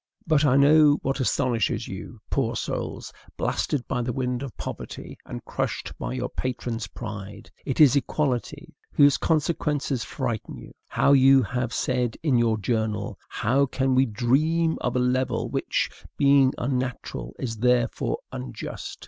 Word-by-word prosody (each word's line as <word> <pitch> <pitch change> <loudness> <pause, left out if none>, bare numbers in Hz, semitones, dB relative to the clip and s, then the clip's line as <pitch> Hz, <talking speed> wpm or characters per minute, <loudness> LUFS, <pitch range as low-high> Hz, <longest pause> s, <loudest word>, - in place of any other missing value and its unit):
But 155 -2 +3
I 135 -2 +4
know 145 +1 +6
what 135 +1 -1
astonishes 125 -3 0
you, - - -8
poor - - 0
souls, - - -4 0.2
blasted 135 -4 -1
by 125 - -1
the 120 +1 -2
wind 125 0 -2
of 135 -5 -7
poverty, - - -7
and - - -7
crushed - - -3
by - - -3
your 125 -1 -2
patrons' 120 -3 -4
pride: 105 -2 -8 0.2
it 135 - -2
is 145 -4 +7
EQUALITY, 145 +3 -1 0.2
whose 145 -1 +5
consequences 150 -4 0
frighten 120 -6 -4
you. - - -11 0.2
How, 140 - +3
you 135 -1 +6
have 125 +1 -2
said 125 -3 -1
in 135 -7 +3
your 115 -2 +2
journal, 110 -1 -2
how 135 +5 +1
can 130 0 0
we 130 +1 +4
"dream 155 +9 +1
of 125 - -1
a - - +3
level 125 +1 0
which, - - 0 0.3
being 140 -2 +5
unnatural, 125 - -3
is 115 -4 -4
therefore 125 +1 +1
unjust? 65 -1 -6
130 Hz, 150 wpm, -25 LUFS, 120-140 Hz, 0.3 s, is